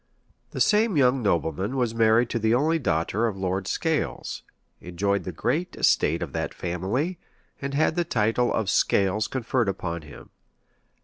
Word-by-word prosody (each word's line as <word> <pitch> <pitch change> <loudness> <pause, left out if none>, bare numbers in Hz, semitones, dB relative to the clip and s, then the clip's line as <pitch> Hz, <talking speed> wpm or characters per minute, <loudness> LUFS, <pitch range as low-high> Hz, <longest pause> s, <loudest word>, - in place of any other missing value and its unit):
[] - - -37
The - - -6
same 210 -4 +3
young 130 -1 +3
nobleman 95 - -1
was 120 -3 0
married 115 +1 +3
to 115 - -1
the 110 +1 +2
only 160 +5 +2
daughter 100 - 0
of 105 -4 -4
Lord 95 0 -2
Scales, 160 +6 -2 0.4
enjoyed 95 +1 -1
the 90 - -3
great 145 - -2
estate - - +2
of - - -7
that - - -3
family, 100 - -2 0.4
and 140 0 -3
had 155 +2 +2
the 175 - +1
title 115 -3 +1
of 110 - -1
Scales 100 +2 +2
conferred 125 -3 -1
upon 85 -3 -4
him. 75 -2 -13
110 Hz, 165 wpm, -25 LUFS, 95-135 Hz, 0.4 s, same